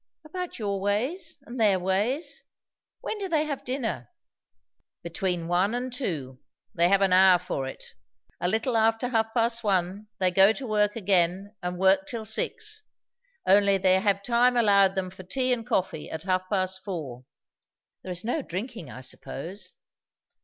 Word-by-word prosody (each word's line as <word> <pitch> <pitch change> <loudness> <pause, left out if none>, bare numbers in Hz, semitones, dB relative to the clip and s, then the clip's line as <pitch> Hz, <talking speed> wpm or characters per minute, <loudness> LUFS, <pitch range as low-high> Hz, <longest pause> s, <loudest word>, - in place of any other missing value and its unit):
"About 360 +3 -6
your 200 -3 -2
ways, 270 - -1
and 245 +1 -8
their 205 -4 +4
ways. 245 - -1 0.6
When 440 - -4
do 390 -2 -4
they 315 -3 +2
have 290 -3 -4
dinner?" 240 - -3 0.9
"Between 170 0 -2
one 185 +6 +1
and 250 0 -4
two. 145 - -4 0.3
They 170 0 +3
have 195 +1 +4
an 190 -2 +3
hour 185 0 +7
for 155 -7 -4
it. 135 - -8 0.6
A 175 - 0
little 225 +5 0
after 225 +2 +2
half 225 -2 0
past 235 0 +1
one 195 +1 0
they 185 -1 +2
go 195 +4 +6
to 270 - -6
work 210 -2 +1
again 190 -1 +1
and 180 0 -4
work 190 +1 +3
till 230 -3 -4
six; 430 - -1 0.6
only 200 0 +5
they 185 0 +4
have 200 -1 +1
time 245 +1 +3
allowed 200 -4 +4
them 185 -1 -2
for 190 - -11
tea 255 +8 0
and 235 -1 -4
coffee 185 -9 -1
at 160 - -6
half 185 0 -1
past 190 -1 -1
four." 140 - -6 0.8
"There 185 - -7
is 180 +1 -5
no 245 +7 -1
drinking, 215 - -6
I 130 - -9
suppose?" 180 +9 -8
200 Hz, 165 wpm, -26 LUFS, 185-235 Hz, 0.9 s, hour